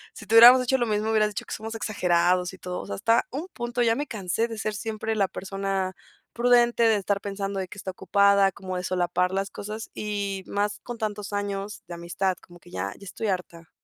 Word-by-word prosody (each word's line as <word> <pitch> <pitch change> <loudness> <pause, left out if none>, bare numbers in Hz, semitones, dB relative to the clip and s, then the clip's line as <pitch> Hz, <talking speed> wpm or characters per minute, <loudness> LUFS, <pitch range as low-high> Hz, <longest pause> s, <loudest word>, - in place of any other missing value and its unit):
Sí 210 - -11
te 225 - +2
hubiéramos 245 +3 +10
hecho 265 +2 +2
lo 240 - +1
mismo, 215 +1 0
hubieras 215 -1 +3
dicho 205 - -5
que - - -7
somos 225 +1 -6
exagerados 180 -4 +1
y 190 - -12
todo, 180 0 -5
está 230 - +3
a - - -22
un 300 +7 -4
punto. 240 0 -3
Ya 230 -1 +3
me 290 +3 -2
cansé 220 -1 -1
de 225 -2 -7
ser 215 -1 -2
siempre 220 0 -3
la 200 -2 +2
persona 195 -1 -3 0.4
prudente 240 0 +4
de 225 -2 +5
estar 200 0 -1
pensando 195 -1 -3
de 185 - -3
que 200 - -11
está 190 - -5
ocupada 200 +1 +3
como 185 -1 -6
de 180 - -4
solapar 180 0 0
las 195 0 -1
cosas, 215 +2 -6
y 200 -2 -3
más 205 0 -1
con 240 -1 -7
tantos 210 -1 -4
años 205 0 -3
de 175 - -7
amistad, 175 +2 -2
como 175 0 -16
que - - -18
ya 95 +2 -3
ya 200 - -12
estoy 220 +4 -4
harta. 170 -3 -4
200 Hz, 220 wpm, -26 LUFS, 185-220 Hz, 0.4 s, hubiéramos